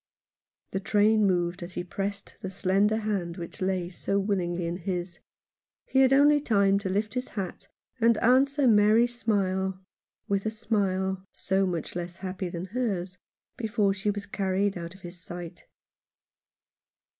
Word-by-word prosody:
The 190 - -1
train 210 +1 +3
moved 175 -1 0
as 175 +1 -7
he 175 - -3
pressed 200 +2 -4
the 190 - -4
slender 195 +3 +2
hand 200 -6 -2
which 170 +1 -7
lay 185 -2 -1
so 195 +2 -1
willingly 180 -4 -1
in 170 +1 -2
his; 175 -1 -4 0.7
he 265 - +1
had 265 -1 +6
only 290 +2 +6
time 200 -6 +3
to 200 -2 -3
lift 205 +3 -1
his 250 0 -2
hat 190 -4 -5 0.3
and 230 -1 +4
answer 270 +4 +4
Mary's 220 +2 +5
smile 190 -4 0 0.5
with 200 +1 0
a - - +2
smile 195 -4 -1
— - - -67 0.2
so 190 0 +3
much 170 -3 -3
less 175 0 -4
happy 185 -1 -4
than 170 +1 -5
hers 190 -7 -2 0.2
— - - -55
before 215 -3 +1
she 200 +2 -2
was 205 0 -3
carried 195 0 0
out 170 0 -6
of 190 - -17
his 175 0 -9
sight. 175 0 -9
195 Hz, 160 wpm, -27 LUFS, 180-215 Hz, 0.7 s, had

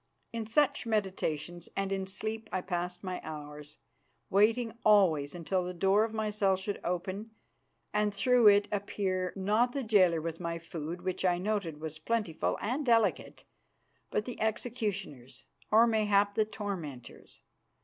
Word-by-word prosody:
In 225 -2 -3
such 250 0 +2
meditations 175 -6 -2
and 195 0 -1
in 190 -1 -2
sleep 220 +3 -5
I 185 - -1
passed 180 0 -3
my 185 -1 -4
hours, 150 -1 -8 0.5
waiting 225 +3 +3
always 175 -9 +4
until 180 +2 -1
the 180 0 -5
door 195 +4 +3
of 225 - -2
my 220 -1 -2
cell 200 -2 +2
should 195 +2 -4
open 185 +5 -3 0.6
and 210 0 +2
through 235 +3 +4
it 205 0 +6
appear, 195 -2 -1
not 215 +6 +2
the 275 - -2
jailer 185 -7 +4
with 165 0 -5
my 170 -1 -3
food, 165 +1 -6
which 185 0 -2
I 180 -2 +3
noted 185 -5 -2
was 155 0 -6
plentiful 205 -2 -1
and 255 +7 -1
delicate, 230 -4 +1 0.6
but 210 - -1
the 245 - -7
executioners 200 - -3 0.2
or 225 +2 +6
mayhap 205 -3 +2
the 215 +1 +2
tormentors. 175 - -7
195 Hz, 150 wpm, -31 LUFS, 175-215 Hz, 0.6 s, it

